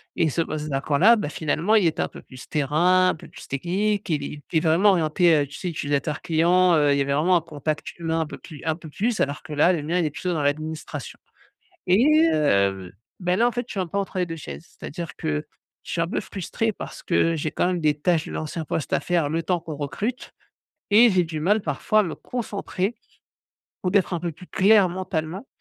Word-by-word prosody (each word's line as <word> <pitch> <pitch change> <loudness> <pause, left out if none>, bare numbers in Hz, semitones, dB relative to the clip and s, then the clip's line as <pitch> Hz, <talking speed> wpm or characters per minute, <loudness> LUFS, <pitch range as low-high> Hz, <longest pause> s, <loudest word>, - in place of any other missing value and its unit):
et 160 - +2
ce 165 - 0
poste 155 -1 -4
vacant 140 +1 0
là, 225 +8 +7
bah, 205 - -2
finalement 160 +8 0
il 195 -6 +5
était 160 - -1
un - - 0
peu - - -11
plus 130 -2 -12
terrain, 175 +6 +3
un - - 0
peu - - -13
plus - - -12
technique, 195 +9 -1
il 150 -3 0
est 145 +1 -7
il 165 - +2
est - - +5
vraiment 175 +5 +4
orienté, 165 -1 +3
heu, - - -6
tu 140 - -11
sais 180 - -3
utilisateur 145 -3 -2
client, 175 +2 +3
heu, 145 -2 +4
il - - +1
y - - +2
avait 140 0 0
vraiment 170 +5 +3
un - - -1
contact 155 -1 -4
humain 165 -1 -1
un - - -1
peu - - -8
plus 155 -4 -11
un 160 -1 +1
peu 165 -1 -12
plus 220 +8 -1
alors 140 +1 -1
que 170 - -11
là, 170 +5 +4
le 155 -4 -2
mien 170 +4 0
il 165 - +1
est 150 - -1
plutôt 180 +4 -3
dans 150 -3 -1
l'administration, 155 +2 -3 0.7
et 190 +8 +4 0.3
heu, 100 -10 +1 0.3
ben, 180 +2 0
là 240 - +4
en - - -4
fait, 245 -1 -2
je - - -6
suis 195 - -2
un 180 - -1
peu 200 - -2
entre 195 -1 -3
les 180 - +1
2 165 - -5
chaises. 160 +2 -9
C'est-à-dire 170 +2 -6
que 75 -1 -2 0.4
je - - -7
suis - - -1
un 165 - 0
peu - - -2
frustré, 215 +4 -3
parce - - -9
que 165 -1 +2
j'ai 155 0 -2
quand - - +1
même 180 -2 -1
des 150 -1 +2
tâches 165 0 +1
de - - -7
l'ancien 155 +1 -4
poste 150 - -3
à - - +3
faire, 170 -5 0
le 165 +1 -1
temps 180 -1 0
qu'on 155 -3 -7
recrute 205 - -4 0.6
et 230 +3 +7
j'ai 180 -2 +3
du 160 -1 -5
mal 205 +6 +3
parfois 165 +8 +1
à - - +4
me 165 - -4
concentrer, 210 -3 -3 0.9
ou 180 - +1
d'être 195 -2 +2
un 170 - -1
peu 170 -1 -2
plus 180 - -13
clair 200 -1 +4
mentalement 180 +2 -4
165 Hz, 245 wpm, -24 LUFS, 150-185 Hz, 0.9 s, là